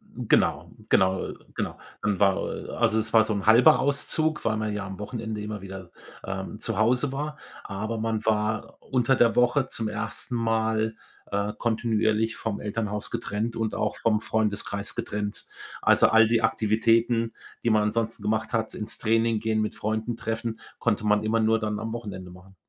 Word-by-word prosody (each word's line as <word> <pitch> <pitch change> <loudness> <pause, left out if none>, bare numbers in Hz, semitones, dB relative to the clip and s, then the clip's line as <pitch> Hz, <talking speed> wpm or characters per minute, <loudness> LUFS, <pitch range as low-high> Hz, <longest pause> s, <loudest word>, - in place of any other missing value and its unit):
Hm, - - -6
genau, - - +2 0.2
genau, 95 0 +4
äh, - - -5 0.2
genau. - - -3 0.2
Dann 105 -2 0
war, 100 -2 +5 0.2
äh - - -8
also 110 -2 +2
es 110 +1 -3
war 110 -1 +7
so 110 - -1
'n 100 -2 -3
1/2 115 +3 +7
Auszug, 150 +3 0
weil 110 -1 +1
man 110 -1 -2
ja 105 -1 -3
am 95 0 -8
Wochenende 110 0 -4
immer 105 -1 -5
wieder, 95 -2 -9 0.3
ähm, 95 +2 -5
zu 115 -3 -3
Hause 125 +5 +2
war. 150 +2 -4 0.3
Aber 110 +3 -4
man 110 -1 -2
war 105 0 0
unter 130 0 +2
der 115 -1 +4
Woche 125 +2 +3
zum 110 -2 -3
1. 120 +3 -4
Mal, 110 -1 0 0.4
äh, 100 +1 -1
kontinuierlich 110 -1 +1
vom 110 -3 -3
Elternhaus 105 0 -3
getrennt 110 +3 -3
und 110 -1 -1
auch 105 - -1
vom 110 -2 +1
Freundeskreis 105 -2 -2
getrennt. 105 0 -4 0.3
Also, - - +5
all 110 0 +6
die 115 0 +2
Aktivitäten, 115 +1 +2 0.3
die 120 - +2
man 110 -1 +4
ansonsten 110 +1 -1
gemacht 110 +1 -1
hat, 110 -1 -1
ins 110 +1 -4
Training 115 0 +2
gehen, 110 0 0
mit 105 - -1
Freunden 110 +2 -2
treffen, 115 0 -3 0.2
konnte 105 -2 0
man 105 0 +3
immer 110 +1 +1
nur 110 0 +3
dann 105 -1 -2
am 110 +1 -4
Wochenende 100 -6 -6
machen. 90 +2 -15
110 Hz, 180 wpm, -26 LUFS, 105-115 Hz, 0.4 s, war